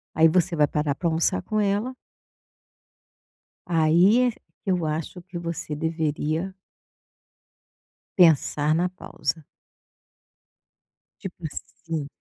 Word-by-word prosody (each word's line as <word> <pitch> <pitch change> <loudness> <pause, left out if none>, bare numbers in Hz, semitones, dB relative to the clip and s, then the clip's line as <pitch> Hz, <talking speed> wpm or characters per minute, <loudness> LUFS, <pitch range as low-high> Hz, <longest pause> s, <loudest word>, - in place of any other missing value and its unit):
aí 160 +1 +6
você 175 +1 +2
vai 150 -1 +4
parar 150 -2 -1
para 170 - -1
almoçar 160 - +1
com 215 - -1
ela. 210 +5 0 1.7
Aí 175 +9 +4
é, 235 - -3 0.3
eu 180 -3 +1
acho 160 +4 -4
que 175 -2 -8
você 170 -2 -4
deveria 160 +3 -2 1.6
pensar 155 -3 +4
na 175 +3 +1
pausa. 160 -4 -4 1.8
Tipo 180 -2 -8
assim, 155 0 -6
165 Hz, 100 wpm, -25 LUFS, 155-185 Hz, 1.8 s, aí